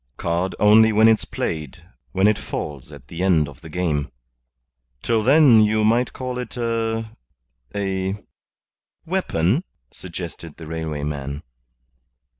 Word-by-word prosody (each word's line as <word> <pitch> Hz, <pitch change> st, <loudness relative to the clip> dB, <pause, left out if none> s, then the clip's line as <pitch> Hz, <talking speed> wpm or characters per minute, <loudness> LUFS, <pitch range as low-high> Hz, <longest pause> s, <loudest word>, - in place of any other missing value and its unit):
"Card 85 Hz, +2 st, -1 dB
only 110 Hz, +2 st, +6 dB
when 110 Hz, +1 st, +5 dB
it's 110 Hz, -1 st, +3 dB
played; 75 Hz, -4 st, -4 dB, 0.3 s
when 95 Hz, +1 st, +1 dB
it 105 Hz, -1 st, +2 dB
falls 70 Hz, -4 st, -6 dB
at -, -, -13 dB
the 85 Hz, +6 st, -6 dB
end 85 Hz, -6 st, +3 dB
of 70 Hz, -1 st, -13 dB
the 80 Hz, -, -11 dB
game. 75 Hz, -4 st, -1 dB, 0.9 s
Till 115 Hz, -2 st, +2 dB
then 130 Hz, -2 st, +6 dB
you 110 Hz, 0 st, +2 dB
may 120 Hz, +3 st, +3 dB
call 125 Hz, -1 st, -5 dB
it 125 Hz, -, -7 dB
a 115 Hz, -1 st, -2 dB, 0.6 s
a 95 Hz, -1 st, -1 dB, 0.5 s
" -, -, -55 dB
"Weapon," 160 Hz, -, 0 dB, 0.3 s
suggested 85 Hz, -3 st, -8 dB
the 80 Hz, -, -9 dB
railway 80 Hz, -2 st, -4 dB
man. 70 Hz, -1 st, -4 dB
95 Hz, 135 wpm, -22 LUFS, 80-115 Hz, 0.9 s, only